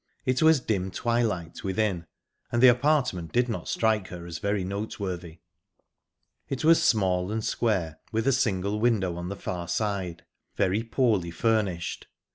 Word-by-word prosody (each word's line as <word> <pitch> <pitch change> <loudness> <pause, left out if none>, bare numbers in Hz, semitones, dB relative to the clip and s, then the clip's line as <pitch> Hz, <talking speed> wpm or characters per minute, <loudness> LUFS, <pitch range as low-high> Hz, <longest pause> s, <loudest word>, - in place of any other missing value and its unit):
It 130 0 +1
was 160 -2 +6
dim 100 -6 -1
twilight 110 -5 -1
within, 95 -4 -1 0.4
and 120 - +1
the 130 - +10
apartment 125 - +1
did 125 0 +2
not 115 - -4
strike 110 -4 +1
her 85 -1 -8
as 85 -2 -6
very 100 -1 0
noteworthy. 95 -4 -5 1.1
It 135 - -3
was 165 +1 +6
small 95 -4 +2
and 110 0 -2
square, 90 -9 -1
with 115 0 -1
a - - +5
single 105 -5 0
window 105 -7 +1
on 85 +1 -5
the 100 - -4
far 90 -3 -5
side; 95 -3 -2 0.3
very 95 +4 +1
poorly 115 -6 +1
furnished. 95 -2 -1
100 Hz, 150 wpm, -27 LUFS, 90-115 Hz, 1.1 s, the